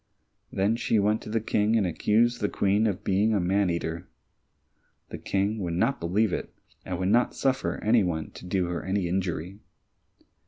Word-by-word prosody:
Then 100 Hz, +4 st, +1 dB
she 115 Hz, -, +1 dB
went 105 Hz, +2 st, +2 dB
to -, -, -9 dB
the 115 Hz, +1 st, 0 dB
King 110 Hz, 0 st, +1 dB
and 110 Hz, -4 st, +2 dB
accused 110 Hz, +7 st, +1 dB
the 105 Hz, -, +1 dB
Queen 100 Hz, +3 st, +2 dB
of 100 Hz, -4 st, -3 dB
being 105 Hz, +3 st, +2 dB
a -, -, +2 dB
man 95 Hz, +2 st, +1 dB
eater. 85 Hz, 0 st, -3 dB, 1.0 s
The -, -, -7 dB
King 100 Hz, +3 st, -1 dB
would 85 Hz, -4 st, -3 dB
not 115 Hz, +10 st, +1 dB
believe 95 Hz, +4 st, +1 dB
it, -, -, -4 dB, 0.3 s
and 90 Hz, -, -4 dB
would 95 Hz, +1 st, -1 dB
not 120 Hz, +4 st, +2 dB
suffer 135 Hz, -1 st, 0 dB
any 110 Hz, +2 st, +4 dB
one 80 Hz, -4 st, -2 dB
to -, -, -11 dB
do 90 Hz, 0 st, 0 dB
her 85 Hz, 0 st, -3 dB
any 95 Hz, -1 st, -1 dB
injury. 90 Hz, +1 st, -3 dB
100 Hz, 185 wpm, -27 LUFS, 90-110 Hz, 1.0 s, any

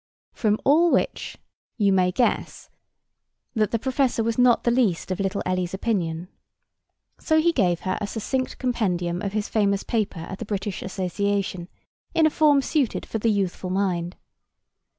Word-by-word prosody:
From 215 Hz, -2 st, +1 dB
all 325 Hz, +5 st, +5 dB
which -, -, -1 dB, 0.4 s
you 200 Hz, -4 st, +3 dB
may 180 Hz, -1 st, +3 dB
guess 240 Hz, +6 st, -1 dB, 0.8 s
that 215 Hz, -3 st, +1 dB
the 230 Hz, -, 0 dB
professor 260 Hz, -1 st, 0 dB
was 230 Hz, 0 st, 0 dB
not 245 Hz, -2 st, +5 dB
the 235 Hz, -, +2 dB
least 220 Hz, -8 st, +1 dB
of 185 Hz, -, -2 dB
little 195 Hz, +1 st, -1 dB
Ellie's 185 Hz, 0 st, -1 dB
opinion. 180 Hz, -6 st, -2 dB, 0.9 s
So 315 Hz, -1 st, +2 dB
he 340 Hz, +2 st, +3 dB
gave 180 Hz, -, +1 dB
her 185 Hz, -1 st, -2 dB
a 210 Hz, -, -2 dB
succinct 255 Hz, +5 st, -3 dB
compendium 180 Hz, -9 st, -1 dB
of 200 Hz, -1 st, -3 dB
his 210 Hz, -1 st, -1 dB
famous 200 Hz, -2 st, +1 dB
paper 215 Hz, -7 st, -2 dB
at 190 Hz, +4 st, -7 dB
the 230 Hz, -, -5 dB
British 200 Hz, -1 st, -3 dB
Association, 195 Hz, 0 st, -2 dB, 0.5 s
in 325 Hz, -, +5 dB
a 310 Hz, -, +4 dB
form 290 Hz, -3 st, +4 dB
suited 280 Hz, -6 st, 0 dB
for 225 Hz, -, -4 dB
the 230 Hz, -, +1 dB
youthful 195 Hz, -3 st, -1 dB
mind. 180 Hz, -2 st, -1 dB
205 Hz, 160 wpm, -24 LUFS, 185-240 Hz, 0.9 s, all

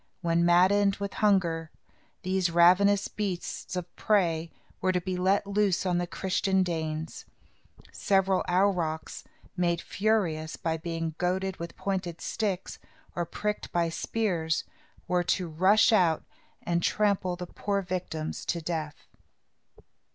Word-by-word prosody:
When 170 Hz, -1 st, +2 dB
maddened 190 Hz, +3 st, +4 dB
with 200 Hz, 0 st, -5 dB
hunger, 170 Hz, -6 st, +2 dB, 0.5 s
these 185 Hz, -1 st, +1 dB
ravenous 185 Hz, +4 st, +5 dB
beasts 190 Hz, -2 st, -4 dB
of 180 Hz, -1 st, -5 dB
prey 170 Hz, -6 st, +1 dB, 0.3 s
were 185 Hz, -, +2 dB
to 180 Hz, -, +1 dB
be 185 Hz, +1 st, -3 dB
let 190 Hz, +3 st, +2 dB
loose 200 Hz, -2 st, +1 dB
on 180 Hz, -1 st, +1 dB
the 175 Hz, -, -2 dB
Christian 190 Hz, +1 st, 0 dB
Danes. 160 Hz, -2 st, -4 dB, 0.7 s
Several 195 Hz, -1 st, +2 dB
aurochs, 175 Hz, -4 st, 0 dB, 0.3 s
made 175 Hz, -2 st, +1 dB
furious 175 Hz, -8 st, 0 dB
by 165 Hz, -1 st, -2 dB
being 165 Hz, 0 st, -3 dB
goaded 185 Hz, +1 st, -1 dB
with 170 Hz, 0 st, -7 dB
pointed 185 Hz, -4 st, -3 dB
sticks, 200 Hz, -4 st, -3 dB, 0.4 s
or 175 Hz, -1 st, -2 dB
pricked 210 Hz, +4 st, -3 dB
by 170 Hz, -1 st, +1 dB
spears, 170 Hz, -3 st, -1 dB, 0.4 s
were 180 Hz, 0 st, +1 dB
to 180 Hz, +1 st, 0 dB
rush 190 Hz, +8 st, +4 dB
out 170 Hz, -6 st, +3 dB, 0.4 s
and 170 Hz, 0 st, 0 dB
trample 195 Hz, -2 st, +1 dB
the 180 Hz, 0 st, -6 dB
poor 200 Hz, +3 st, -2 dB
victims 175 Hz, -4 st, -4 dB
to 170 Hz, -, -1 dB
death. 155 Hz, -3 st, -5 dB
180 Hz, 130 wpm, -28 LUFS, 170-195 Hz, 0.7 s, ravenous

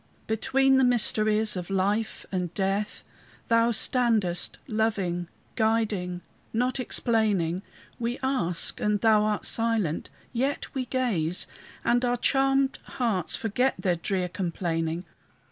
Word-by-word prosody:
Between 265 Hz, +4 st, +3 dB
the 265 Hz, -, +4 dB
mysteries 215 Hz, -3 st, +3 dB
of 180 Hz, -1 st, -4 dB
death 200 Hz, +3 st, -1 dB
and 180 Hz, -2 st, -1 dB
life 195 Hz, +2 st, -1 dB, 0.5 s
Thou 230 Hz, 0 st, +4 dB
standest, 220 Hz, -6 st, +1 dB
loving, 200 Hz, -6 st, 0 dB, 0.3 s
guiding, 215 Hz, -6 st, 0 dB, 0.3 s
not 250 Hz, +3 st, 0 dB
explaining; 210 Hz, -8 st, +1 dB, 0.4 s
We 240 Hz, +1 st, -2 dB
ask, 215 Hz, -11 st, 0 dB
and 210 Hz, 0 st, +1 dB
thou 215 Hz, -1 st, +4 dB
art 210 Hz, -1 st, 0 dB
silent; 225 Hz, -8 st, 0 dB, 0.2 s
yet 265 Hz, +4 st, -1 dB
we 255 Hz, -2 st, -2 dB
gaze, 190 Hz, -11 st, 0 dB, 0.4 s
And 240 Hz, +1 st, +3 dB
our 245 Hz, 0 st, +1 dB
charmed 270 Hz, +1 st, +2 dB, 0.2 s
hearts 220 Hz, -9 st, +1 dB
forget 245 Hz, +4 st, 0 dB
their 180 Hz, -3 st, +1 dB
drear 180 Hz, +2 st, -1 dB
complaining. 170 Hz, -2 st, -2 dB
215 Hz, 115 wpm, -27 LUFS, 185-240 Hz, 0.5 s, the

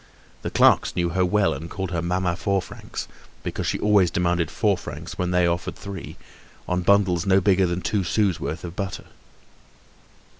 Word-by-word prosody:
The -, -, -3 dB
clerks -, -, +4 dB
knew 85 Hz, -1 st, +1 dB
her 90 Hz, +2 st, +1 dB
well 100 Hz, +2 st, +2 dB
and 85 Hz, +2 st, -7 dB
called 95 Hz, 0 st, -4 dB
her 85 Hz, -1 st, -1 dB
"Mamma 90 Hz, 0 st, 0 dB
Four 100 Hz, +1 st, 0 dB
Francs," 90 Hz, -2 st, -7 dB, 0.4 s
because -, -, -3 dB
she -, -, 0 dB
always 105 Hz, -4 st, +4 dB
demanded 85 Hz, -1 st, 0 dB
four -, -, +1 dB
francs -, -, -8 dB
when 90 Hz, -1 st, -1 dB
they 90 Hz, -1 st, +3 dB
offered 85 Hz, +1 st, -1 dB
three, 100 Hz, -2 st, -8 dB, 0.5 s
on 90 Hz, 0 st, 0 dB
bundles 95 Hz, -2 st, +3 dB
no 95 Hz, 0 st, +5 dB
bigger 95 Hz, -1 st, +3 dB
than 85 Hz, +1 st, -2 dB
two 100 Hz, +1 st, 0 dB
sous' 95 Hz, -1 st, +1 dB
worth 80 Hz, +1 st, -4 dB
of 85 Hz, -1 st, -7 dB
butter. 100 Hz, -1 st, -4 dB
90 Hz, 180 wpm, -24 LUFS, 85-95 Hz, 0.5 s, no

